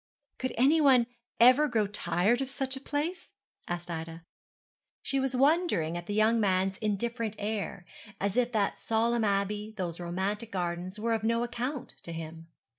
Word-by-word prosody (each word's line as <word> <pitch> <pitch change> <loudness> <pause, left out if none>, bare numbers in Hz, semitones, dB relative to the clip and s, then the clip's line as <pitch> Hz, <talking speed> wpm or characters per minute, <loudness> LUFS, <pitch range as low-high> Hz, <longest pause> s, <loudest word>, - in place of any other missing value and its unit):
'Could 260 - -1
anyone 270 -2 +5 0.3
ever 255 +6 +7
grow 225 -5 +1
tired 205 +3 +1
of 270 - -2
such 270 -1 -3
a - - -6
place?' 315 +7 -3 0.3
asked 175 0 -4
Ida. 165 0 -6 0.8
She 275 - 0
was 265 -1 -1
wondering 275 - +2
at 175 0 -6
the 205 - -2
young 220 +2 +4
man's 190 -2 +1
indifferent 225 +1 -2
air, 205 -3 -3 0.3
as 200 0 0
if 245 -1 +2
that 210 -4 0
solemn 230 +1 +1
abbey, 205 +1 -1
those 175 -3 -3
romantic 190 +6 -3
gardens, 180 +1 -3
were 230 +1 0
of 220 -1 -1
no 230 +1 +2
account 250 +3 -4
to 170 - -8
him. 165 0 -7
220 Hz, 160 wpm, -29 LUFS, 185-250 Hz, 0.8 s, ever